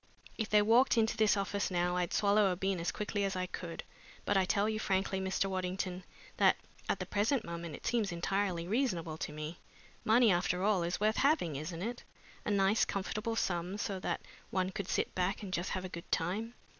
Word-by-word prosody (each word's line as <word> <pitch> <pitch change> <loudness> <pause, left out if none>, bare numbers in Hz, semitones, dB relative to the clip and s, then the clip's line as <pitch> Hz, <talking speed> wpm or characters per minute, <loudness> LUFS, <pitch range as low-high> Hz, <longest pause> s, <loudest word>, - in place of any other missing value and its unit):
If 220 -2 -3
they 210 -1 +5
walked 235 +4 +5
into 225 0 +3
this 215 -2 +3
office 200 +1 -1
now 180 -1 +1
I'd 180 -1 0
swallow 205 -1 +4
a - - 0
bean 190 0 -1
as 170 - -1
quickly 205 -1 -2
as 195 -1 -1
I 185 0 -1
could, 175 -2 -6 0.4
but 205 - +1
I 190 -1 +4
tell 200 +3 +2
you 215 0 -1
frankly, 190 -2 0
Mr. 190 +1 0
Waddington, 185 -1 -3 0.3
that - - +5 0.3
at - - +2
the - - -3
present 220 +5 +1
moment 170 -2 -5
it - - -12
seems 225 -5 +1
entirely 175 0 -1
reasonable 180 - -1
to - - -3
me. 155 +3 -6 0.4
Money, 230 0 +5
after 180 +1 +1
all, 205 -3 +3
is 170 +2 -1
worth 215 +1 +2
having, 275 - +2
isn't 165 +5 -4
it? 240 +3 -4 0.4
a - - -1
nice 200 +1 +3
comfortable 215 +4 -2
sum 180 -1 -1
so 200 -2 -2
that - - -2 0.3
one 185 0 0
could 195 0 -4
sit - - 0
back 180 +3 -1
and 190 -2 -6
just 175 0 -1
have 185 0 -3
a - - -5
good 170 -1 -9
time. 210 +8 -1
195 Hz, 205 wpm, -33 LUFS, 180-210 Hz, 0.4 s, they